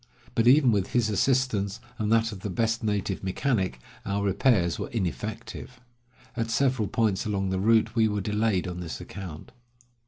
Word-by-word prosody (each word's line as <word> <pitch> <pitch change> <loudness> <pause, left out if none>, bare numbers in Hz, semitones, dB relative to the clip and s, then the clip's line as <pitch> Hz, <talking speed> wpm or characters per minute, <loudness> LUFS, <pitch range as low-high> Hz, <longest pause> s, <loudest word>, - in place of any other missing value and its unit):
But 115 +1 +2
even 130 -1 +6
with 100 -3 0
his 115 -3 +2
assistance, 110 -2 +1 0.2
and 105 0 0
that 115 0 +3
of 105 - -8
the 100 - -5
best 115 +4 0
native 105 -3 -1
mechanic, 95 - -1 0.2
our 100 +1 -1
repairs 95 -3 +2
were - - -4
ineffective. 110 +4 -5 0.6
At 115 0 -2
several 125 -2 +1
points 110 -3 0
along 95 -2 -1
the 95 - 0
route 110 +2 +3
we 110 -2 +4
were 105 -1 -1
delayed 105 -2 0
on 90 0 -5
this 85 -2 -5
account. 85 -5 -9
105 Hz, 165 wpm, -27 LUFS, 95-115 Hz, 0.6 s, even